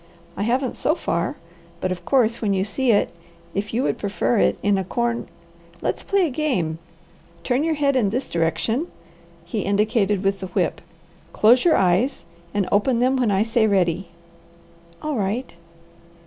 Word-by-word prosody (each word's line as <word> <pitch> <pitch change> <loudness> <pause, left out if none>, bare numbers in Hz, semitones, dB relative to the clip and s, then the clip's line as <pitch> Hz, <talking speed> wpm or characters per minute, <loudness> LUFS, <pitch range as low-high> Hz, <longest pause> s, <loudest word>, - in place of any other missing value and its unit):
"I - - -4
haven't 250 +4 0
so 310 - +1
far, - - -2 0.4
but 185 - -1
of 185 - -5
course, 235 -4 +2
when 200 -3 +1
you 190 - +1
see 255 +5 -1
it, 205 - +2 0.4
if 205 +1 -3
you 240 +4 0
would - - -1
prefer 205 +3 0
it - - +2
in 205 -1 +3
a - - -1
corn 235 +5 -2 0.5
Let's - - -2
play 395 -2 +2
a 310 - -2
game! 225 - -1 0.6
Turn 255 +3 +1
your 320 -1 +1
head 280 -2 +1
in 230 -6 +2
this 250 +6 -2
direction," 170 - 0 0.6
he 205 +5 -3
indicated 205 0 +1
with 195 0 +1
the 190 - -5
whip, 180 - -1 0.5
"close 240 +4 +5
your 340 -3 +5
eyes, 190 +9 +2 0.3
and 205 -2 0
open 230 +5 +2
them 255 +3 +2
when 250 -4 +1
I 195 +1 +3
say 225 0 +2
ready." 190 -2 +1 1.0
"All 305 -3 -2
right!" 215 +4 -2
220 Hz, 170 wpm, -22 LUFS, 195-255 Hz, 1.0 s, close